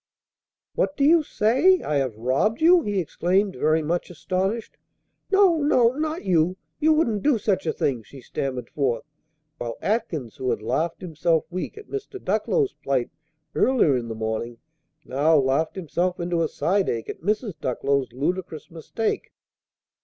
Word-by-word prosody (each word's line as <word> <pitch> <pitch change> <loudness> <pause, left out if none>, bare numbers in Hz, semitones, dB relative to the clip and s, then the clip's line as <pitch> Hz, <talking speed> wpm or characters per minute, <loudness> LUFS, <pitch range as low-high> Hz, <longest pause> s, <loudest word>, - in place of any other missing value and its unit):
"What 285 - -1
do 280 - +1
you 325 +3 +6
say? 290 - +3
I 150 - 0
have 130 -6 -1
robbed 130 - +1
you?" 345 +2 +6
he 205 -6 -2
exclaimed, 185 +4 0
very 155 +1 +2
much 170 +3 -1
astonished. 190 +6 -2 0.5
"No, 390 -4 +5
no! 255 -6 +4
not 310 +4 -3
you! 180 0 +2 0.2
You 315 +1 +4
wouldn't 235 -10 +1
do 290 -4 +3
such 190 -4 -1
a - - +3
thing!" 125 -5 -1
she 135 +5 -13
stammered 130 0 -4
forth, 135 -5 0 0.6
while 115 -1 -4
Atkins, 175 - -2
who 130 - -2
had 105 - -1
laughed 155 +9 -1
himself 165 -2 0
weak 185 - -4
at 425 - -11
Mr. 410 -1 -6
Ducklow's 430 -1 0
plight 130 -3 -2 0.4
earlier 245 - +3
in 120 -2 -2
the 115 - -5
morning, 110 +2 -3 0.5
now 150 +5 +3
laughed 140 +3 +1
himself 180 0 -1
into 170 -1 0
a 165 - +2
side 190 +5 0
ache 115 -1 -3
at - - -7
Mrs. 210 0 -1
Ducklow's 135 +1 0
ludicrous 160 +5 -3
mistake. 170 +7 -3
175 Hz, 160 wpm, -24 LUFS, 140-230 Hz, 0.6 s, you